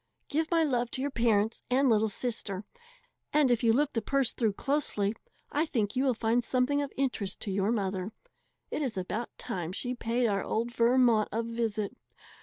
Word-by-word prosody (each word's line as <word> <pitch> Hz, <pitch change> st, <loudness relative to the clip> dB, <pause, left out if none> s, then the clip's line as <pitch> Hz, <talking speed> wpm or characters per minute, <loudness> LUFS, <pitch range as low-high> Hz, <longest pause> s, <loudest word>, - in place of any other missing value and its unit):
Give 315 Hz, +2 st, 0 dB
my 330 Hz, -1 st, +3 dB
love 245 Hz, -5 st, +1 dB
to 260 Hz, -, -2 dB
your 285 Hz, -, -1 dB
parents 225 Hz, -2 st, +1 dB
and 265 Hz, +2 st, +3 dB
little 220 Hz, -2 st, +3 dB
sister; 210 Hz, -3 st, -3 dB, 0.7 s
and 295 Hz, -4 st, +4 dB
if 240 Hz, 0 st, +2 dB
you 230 Hz, -, +5 dB
look 290 Hz, +5 st, +2 dB
the 230 Hz, -, 0 dB
purse 275 Hz, +3 st, +1 dB
through 220 Hz, -4 st, +1 dB
closely, 215 Hz, -6 st, 0 dB, 0.4 s
I 305 Hz, +3 st, +1 dB
think 215 Hz, -7 st, -1 dB
you 260 Hz, -, +2 dB
will 255 Hz, -3 st, +2 dB
find 230 Hz, +2 st, +1 dB
something 260 Hz, +4 st, +1 dB
of 285 Hz, -, -3 dB
interest 250 Hz, -8 st, -1 dB
to 200 Hz, -, -2 dB
your 195 Hz, +2 st, +1 dB
mother. 195 Hz, -2 st, -1 dB, 0.6 s
It -, -, -2 dB
is 255 Hz, -8 st, -2 dB
about 210 Hz, +6 st, -3 dB
time 175 Hz, -2 st, -4 dB
she 245 Hz, +6 st, -3 dB
paid 240 Hz, 0 st, 0 dB
our 200 Hz, -3 st, +1 dB
old 230 Hz, +2 st, -1 dB
Vermont 235 Hz, -2 st, +4 dB
a 230 Hz, +2 st, -1 dB
visit. 230 Hz, -1 st, -2 dB
235 Hz, 190 wpm, -30 LUFS, 210-260 Hz, 0.7 s, you